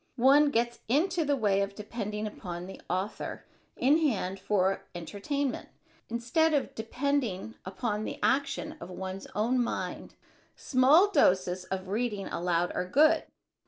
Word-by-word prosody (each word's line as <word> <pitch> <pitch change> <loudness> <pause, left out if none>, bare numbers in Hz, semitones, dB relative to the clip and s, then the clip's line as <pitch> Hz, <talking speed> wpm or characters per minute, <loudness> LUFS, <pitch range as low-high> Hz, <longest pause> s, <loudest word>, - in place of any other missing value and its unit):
One 280 +4 +6
gets 235 -2 0
into 330 - +2
the 290 -1 +1
way 205 -6 +2
of 200 0 -3
depending 210 0 -4
upon 180 -4 -6
the 190 - -10
author 190 +4 -3 0.3
in 285 +5 +4
hand 195 - 0
for 195 -1 0
entertainment 240 - -3 0.4
instead 240 +8 +2
of 280 - -1
depending 225 -3 -2
upon 210 +3 -2
the - - -5
action 280 +3 0
of - - -7
one's 190 +1 -6
own 240 +4 +2
mind. - - -4 0.4
Small 295 +10 +4
doses 185 - +2
of 190 0 -4
reading 210 -1 -2
aloud 175 0 0
are 180 - -2
good. 300 +10 +4
220 Hz, 135 wpm, -29 LUFS, 190-275 Hz, 0.4 s, One